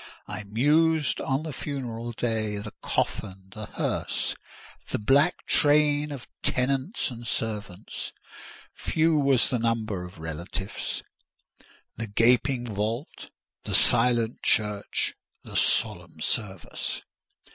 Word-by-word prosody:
I 105 - -5
mused 150 +8 +3
on 135 +2 0
the 160 -2 -5
funeral 120 -6 -4
day, 110 -3 -1
the 105 +1 -6
coffin, 95 0 -2
the 110 -1 -7
hearse, - - -1 0.5
the - - 0
black 140 +10 +3
train 150 0 +4
of 135 -4 -7
tenants 135 - 0
and 120 -1 -8
servants—few 110 - -3
was 140 -4 +4
the 125 - +1
number 110 -5 0
of 90 +1 -10
relatives—the 85 +6 -7
gaping 120 +4 +3
vault, 110 +5 -3 0.3
the - - -1
silent 120 -2 +4
church, 105 -1 +1 0.3
the - - -9
solemn - - +1
service. 95 -6 -2
115 Hz, 105 wpm, -27 LUFS, 105-140 Hz, 0.5 s, train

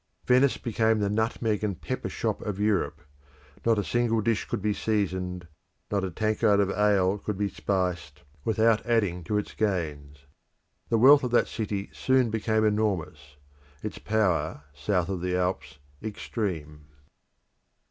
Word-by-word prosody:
Venice 130 +2 +4
became 110 -1 +1
the 100 -1 0
nutmeg 110 0 0
and 100 -5 -2
pepper - - -4
shop - - -2
of 100 -2 -4
Europe: 100 -6 0 0.6
not 115 -1 +3
a 105 - +1
single 115 +4 +1
dish 110 0 0
could - - -3
be 105 +1 0
seasoned, 95 -5 -2 0.4
not 100 -2 0
a 95 - -1
tankard 110 +2 +2
of 100 -1 +2
ale 100 -1 +2
could 105 -1 -4
be 105 0 0
spiced, 90 -8 -2 0.2
without 110 0 +2
adding 100 -7 +1
to 105 +5 -1
its 105 - -3
gains. 75 -9 -3 0.6
The 115 - +3
wealth 135 +5 +7
of 125 - 0
that 120 - +3
city 100 -3 -4
soon 130 -3 +2
became 110 0 +1
enormous; 90 -9 -1 0.5
its - - -5
power, 90 -9 0
south 90 +2 0
of 95 -2 -3
the 90 0 -1
Alps, 90 -3 -2 0.4
supreme. 75 -9 -4
105 Hz, 145 wpm, -27 LUFS, 90-110 Hz, 0.6 s, wealth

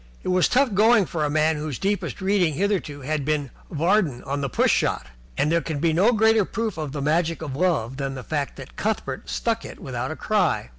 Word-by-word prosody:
It - - -3
was 185 -1 +4
tough 255 -3 +2
going 215 +1 +5
for 160 -2 -3
a 150 - +1
man 155 +1 +2
whose 150 -3 -4
deepest 200 0 -2
reading 190 -5 +2
hitherto 180 -6 -1
had 150 +2 -2
been 145 -2 -1 0.2
Vardon 165 - +1
on 140 +1 -3
the 140 - -2
Push - - +2
Shot, - - 0 0.3
and 150 - +2
there 170 0 +3
can 160 -3 -4
be 160 +2 +1
no 195 +9 +4
greater 220 -1 +4
proof 220 +1 -3
of 155 -3 -4
the 145 -1 -4
magic 165 +2 0
of 140 -4 -5
love 140 -7 0
than 135 -1 -3
the 130 - -7
fact 145 -1 -3
that 135 - -11
Cuthbert 200 -11 -3
stuck 230 -1 -1
it - - -9
without 125 -1 -4
a 155 - -4
cry. 185 - 0
160 Hz, 225 wpm, -24 LUFS, 145-200 Hz, 0.3 s, going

